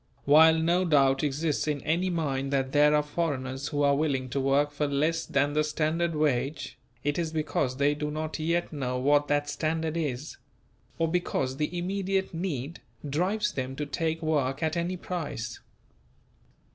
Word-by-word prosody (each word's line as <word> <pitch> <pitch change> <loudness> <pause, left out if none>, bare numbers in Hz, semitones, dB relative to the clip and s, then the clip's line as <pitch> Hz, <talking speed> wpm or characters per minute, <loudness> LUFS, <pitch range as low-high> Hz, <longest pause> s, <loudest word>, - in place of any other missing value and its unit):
While 160 +3 +7
no 170 +3 +2
doubt 135 -5 +3
exists 150 +2 0
in 150 -1 0
any 175 +4 0
mind 140 -5 -1
that 135 -1 0
there 150 +1 +5
are 150 - +3
foreigners 140 -4 -3
who 145 -1 -1
are 140 0 +4
willing 140 -4 0
to 140 - -1
work 140 +2 +2
for 145 0 -1
less 155 +4 0
than 145 +1 +1
the 155 +1 +2
standard 155 +2 0
wage, 145 0 -1 0.2
it 145 +3 0
is 165 -2 -1
because 150 -4 -1
they 145 +1 +3
do 150 0 -3
not 155 +1 -4
yet 170 +2 -1
know 125 -3 -2
what 145 +3 +3
that 145 0 +1
standard 160 +1 -1
is; 150 -3 -3 0.6
or 165 - +1
because 145 -6 -1
the 155 +4 -2
immediate 190 +1 -1
need 165 -4 -4 0.3
drives 190 +10 0
them 130 0 -3
to 150 +1 -3
take 160 +2 -2
work 145 -2 0
at 160 0 0
any 175 +2 -1
price. 155 -10 -5
150 Hz, 170 wpm, -28 LUFS, 140-165 Hz, 0.6 s, While